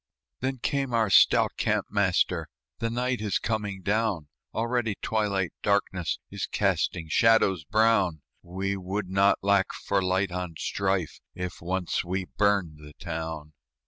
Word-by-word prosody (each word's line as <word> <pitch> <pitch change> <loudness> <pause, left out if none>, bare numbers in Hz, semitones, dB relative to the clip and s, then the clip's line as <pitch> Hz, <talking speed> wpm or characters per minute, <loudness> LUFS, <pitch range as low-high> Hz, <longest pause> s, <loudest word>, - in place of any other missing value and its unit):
Then 130 +1 -2
came 135 0 -1
our 110 -3 +2
stout - - +6
camp - - +1
master, 90 -5 +1 0.3
"The 115 - -1
night 125 0 -1
is 105 -3 0
coming 105 -4 -3
down; 100 -6 0 0.2
Already 115 -2 -1
twilight 100 -5 -1
darkness 95 -4 0
Is - - -3
casting 80 -1 0
shadows 95 -2 +3
brown; 100 -5 +2 0.2
We 95 +3 -3
would 95 +1 -4
not 100 +1 +4
lack 100 -1 +3
for 100 -1 -1
light 95 +1 0
on 90 -2 -4
strife 95 -4 -1 0.2
If 90 -1 -5
once 90 0 -1
we 90 +1 -2
burned 100 -7 0
the 75 0 -12
town." 80 -3 -6
95 Hz, 140 wpm, -27 LUFS, 90-110 Hz, 0.3 s, stout